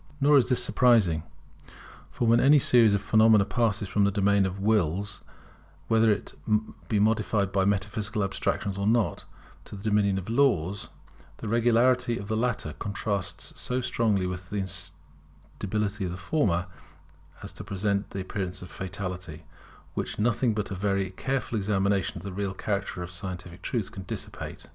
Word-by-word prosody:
Nor 145 0 +6
is 125 - 0
this 125 - +3
surprising; 110 -11 +3 0.9
for 120 - -1
when 115 +1 +5
any 140 +4 +6
series 115 -6 +5
of 100 - -2
phenomena 110 -1 +5
passes 110 -4 0
from 100 +2 +1
the 100 - +4
dominion 100 -1 +2
of 95 +1 -6
Wills, 100 -2 0 0.7
whether 110 -2 +4 0.7
modified 105 -2 +2
by 95 -2 +2
metaphysical 105 +1 -1
abstractions 100 0 -2
or 100 - 0
not, 115 -1 +1 0.4
to - - -9
the 100 - -10
dominion 105 -2 +2
of 95 - -5
Laws, 110 - +1 0.5
the 115 - -7
regularity 120 +2 +3
of 100 -1 -7
the 110 - 0
latter 115 -9 -1
contrasts 100 -1 -3
so 125 +1 -1
strongly 110 -6 +1
with 90 0 -5
the 105 - -3
instability 100 +2 -4
of - - -2
the 90 - -5
former, 90 - 0 0.8
as - - -7
to - - -9
present 100 +1 -1
an 95 - -2
appearance 95 -1 -4
of 90 - -11
fatality, 90 -3 -6 0.5
which - - -4
nothing 115 +1 +1
but 105 -2 -3
a - - -1
very 100 0 -1
careful 125 +2 -2
examination 100 -1 0
of 85 - -9
the 100 -2 -6
real 100 -1 -3
character 100 -3 -3
of 90 - -8
scientific 90 -1 -7
truth 110 -4 -3
can 105 -4 -8
dissipate. - - -7
100 Hz, 160 wpm, -27 LUFS, 95-110 Hz, 0.9 s, Nor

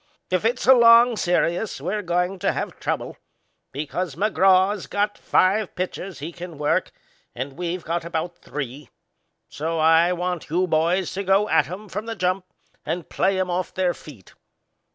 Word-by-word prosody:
If 185 +3 +1
it's 245 +2 0
a 265 - +8
long 235 0 +7
serious 180 0 0
we're 190 +9 -2
goin' 180 +1 -1
to - - +1
have - - -5
trouble, - - -3 0.5
because 155 +3 -4
McGraw's 195 0 +3
got 205 +1 -1
five 195 +2 +1
pitchers 185 0 -4
he 155 +4 -6
can 175 -2 -9
work 150 0 0 0.4
and 135 +3 -5
we've 175 +2 -4
got 170 +1 -2
about 170 +1 -4
three; 140 -1 -7 0.6
so 165 +3 -3
I 165 +2 +4
want 180 -2 -3
you 180 +4 +1
boys 170 +2 +1
to 195 - -3
go 195 +2 +3
at 145 - +3
'em 200 +4 -7
from 210 +3 -5
the 230 - -4
jump 185 0 -1 0.4
and 175 -2 -4
play 190 0 +1
'em 185 -1 -1
off 180 0 -3
their 185 -2 +1
feet. 120 - -14
180 Hz, 165 wpm, -23 LUFS, 165-195 Hz, 0.6 s, a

